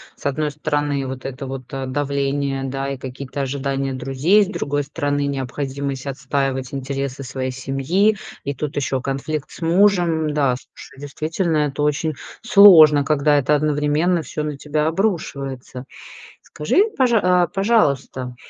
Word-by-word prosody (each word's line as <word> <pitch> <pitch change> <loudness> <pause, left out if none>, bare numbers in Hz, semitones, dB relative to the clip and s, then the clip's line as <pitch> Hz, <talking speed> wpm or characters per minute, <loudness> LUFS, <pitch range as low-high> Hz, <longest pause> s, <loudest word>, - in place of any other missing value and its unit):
с - - -18
одной 150 +2 0
стороны, 145 -1 -1
вот 130 0 -7
это 135 +1 -5
вот, 130 -1 -7
э, 135 -1 -3
давление, 140 0 -1
да, 135 +1 -3
и 140 - -4
какие-то 130 +2 -6
ожидания 135 0 -2
друзей, 135 +11 +2
с - - -4
другой 145 -7 -2
стороны, 145 0 -2
необходимость 135 0 -4
отстаивать 135 -1 -2
интересы 135 0 -4
своей 130 0 -4
семьи, 135 +11 +1 0.3
и 140 - -2
тут 145 +2 -4
еще 135 -2 -1
конфликт 140 +3 -3
с - - -12
мужем. 170 -3 +2
Да, 140 -4 +2
слушай, 135 +1 -14
действительно, 155 +4 -2
это 145 -1 0
очень 150 +2 0 0.3
сложно, 175 -10 +8
когда 150 0 +3
это 145 +2 +2
одновременно 150 +4 +1
всё 150 - -4
на 150 -2 -4
тебя 150 +2 -1
обрушивается. 140 - -3 0.6
Скажи, 365 - +1
пожа 240 -4 +3
а 180 -1 +3
пожалуйста, 145 - 0
140 Hz, 145 wpm, -20 LUFS, 135-155 Hz, 0.6 s, сложно